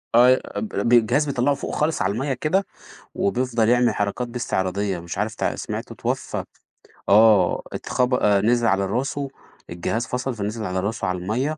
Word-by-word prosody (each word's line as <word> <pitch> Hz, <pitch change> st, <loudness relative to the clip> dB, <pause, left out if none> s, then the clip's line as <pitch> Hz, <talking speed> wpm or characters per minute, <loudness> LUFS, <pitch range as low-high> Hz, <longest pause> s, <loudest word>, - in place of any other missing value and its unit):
أي 125 Hz, +2 st, +6 dB
أب 220 Hz, -, -4 dB
ب 120 Hz, -9 st, 0 dB
الجهاز 120 Hz, +6 st, +4 dB
بيطلّعُه 140 Hz, 0 st, +1 dB
فوق -, -, -5 dB
خالص 155 Hz, -5 st, 0 dB
على 95 Hz, +2 st, +1 dB
المَيّة 135 Hz, +5 st, -1 dB
كده، 160 Hz, +9 st, 0 dB, 0.5 s
وبيفضل 125 Hz, -, +1 dB
يعمل 125 Hz, 0 st, +3 dB
حركات 105 Hz, +4 st, -2 dB
بيه 120 Hz, +1 st, -6 dB
استعراضية، 95 Hz, -2 st, -1 dB
مش 85 Hz, +1 st, -7 dB
عارف 105 Hz, +1 st, -2 dB
تع -, -, -1 dB
سمعت -, -, -5 dB
اتوفّى، -, -, -3 dB, 0.7 s
آه، 105 Hz, -3 st, +5 dB
اتخب 125 Hz, 0 st, -1 dB
آآ، 105 Hz, -5 st, +3 dB
نزل 120 Hz, +2 st, +2 dB
على 95 Hz, -1 st, +2 dB
راسُه 135 Hz, +7 st, -2 dB, 0.4 s
الجهاز 110 Hz, +7 st, -2 dB
فصل، 125 Hz, +2 st, -2 dB
فنزل 110 Hz, +1 st, -4 dB
على 95 Hz, +1 st, -2 dB
راسه 105 Hz, +2 st, -2 dB
على 90 Hz, 0 st, -1 dB
المَيّة 125 Hz, +12 st, -2 dB
115 Hz, 170 wpm, -23 LUFS, 100-130 Hz, 0.7 s, أي